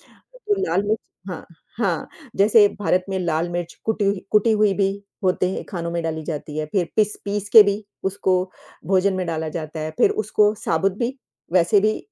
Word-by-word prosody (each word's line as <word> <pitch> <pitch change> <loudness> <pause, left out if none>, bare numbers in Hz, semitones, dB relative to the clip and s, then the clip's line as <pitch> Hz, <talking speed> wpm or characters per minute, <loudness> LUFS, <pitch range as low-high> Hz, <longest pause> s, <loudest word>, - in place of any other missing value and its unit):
वो 475 -5 -4
लाल-मिर्च 205 +3 0 0.3
हाँ, 180 - -7 0.3
हाँ, - - -1 0.3
जैसे 205 +1 +6
भारत 180 0 +1
में 190 - -1
लाल 170 -1 -1
मिर्च 175 -1 -4
कुटी 220 -2 0
हुई 195 -1 -1
कुटी 215 +2 +4
हुई 210 -2 +3
भी 195 0 +1 0.3
होते 185 0 +1
हैं, - - -4
खानों 170 -4 -4
में 170 0 -2
डाली 160 -1 -3
जाती 150 -1 -5
है, 155 - -1
फिर 180 -4 +1
पिस 210 -1 +2
पीस 205 0 -3
के 220 - +11
भी 205 +1 -1 0.2
उसको 190 -1 +1 0.5
भोजन 195 +1 +3
में 185 -1 -2
डाला 160 -1 -2
जाता 155 -1 -6
है, 155 0 -3
फिर - - +5
उसको 210 0 +2
साबुत 195 -1 +1
भी, 240 +2 -1 0.4
वैसे 180 +3 +4
भी, 215 +1 +1
195 Hz, 190 wpm, -22 LUFS, 170-210 Hz, 0.5 s, के